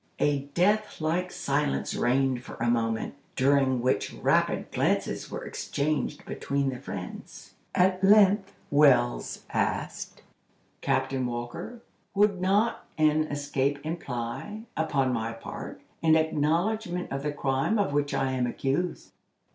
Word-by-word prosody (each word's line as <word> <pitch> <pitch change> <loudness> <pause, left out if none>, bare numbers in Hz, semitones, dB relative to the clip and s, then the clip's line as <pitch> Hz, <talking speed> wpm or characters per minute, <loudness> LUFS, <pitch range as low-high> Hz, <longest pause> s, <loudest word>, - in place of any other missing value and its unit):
A 145 -1 +1
deathlike 180 -3 +1
silence 140 0 -1
reigned 130 0 +1
for - - -9
a 120 0 +1
moment, 115 -1 0 0.2
during 130 -2 +3
which 130 - +1
rapid - - +1
glances - - 0
were - - -5
exchanged 150 0 -2
between 140 -1 -1
the 125 -2 -5
friends. 90 -8 -8 0.2
At 185 +1 +3
length 200 0 +5 0.2
Wells 145 -4 +3
asked: - - -2 0.6
"Captain 135 -1 0
Walker, 120 - -6 0.3
would 200 -2 +3
not 205 +5 +1
an 155 0 +3
escape 145 -1 -1
imply, 155 - -4
upon 140 -5 +1
my 115 -1 -2
part, 115 - -8 0.2
an 160 -1 +5
acknowledgment 175 +5 0
of 135 0 -2
the 150 +1 -1
crime 140 +8 0
of 200 -8 +1
which 145 0 +1
I 135 -1 +1
am 125 -2 0
accused?" 140 +8 -2
145 Hz, 125 wpm, -28 LUFS, 130-180 Hz, 0.6 s, length